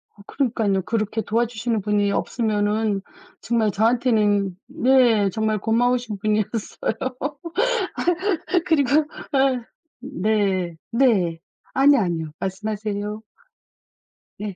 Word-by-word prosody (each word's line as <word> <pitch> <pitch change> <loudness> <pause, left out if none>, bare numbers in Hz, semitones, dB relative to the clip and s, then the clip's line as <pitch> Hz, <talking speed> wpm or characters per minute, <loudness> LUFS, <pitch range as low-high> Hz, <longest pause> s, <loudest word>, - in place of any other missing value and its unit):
아 200 - -16
그러니깐요. 220 -8 0
그렇게 220 0 -1
도와주시는 230 0 -1
분이 205 0 +1
없으면은 210 -2 0 0.4
정말 225 -3 +1
저한테는 210 -4 +2
네. 250 -7 +3
정말 220 +1 0
고마우신 235 0 +1
분이었어요. 215 +1 -1 1.8
그리고 300 -2 +3 0.3
아 265 -3 +2 0.4
네 200 - -1 0.2
네. 205 -10 +2 0.4
아니요, 275 +1 +5
아니요. 165 -4 -2
말씀하세요. 210 +1 -3 1.2
네. 205 -3 -5
215 Hz, 230 characters per minute, -22 LUFS, 205-240 Hz, 1.8 s, 아니요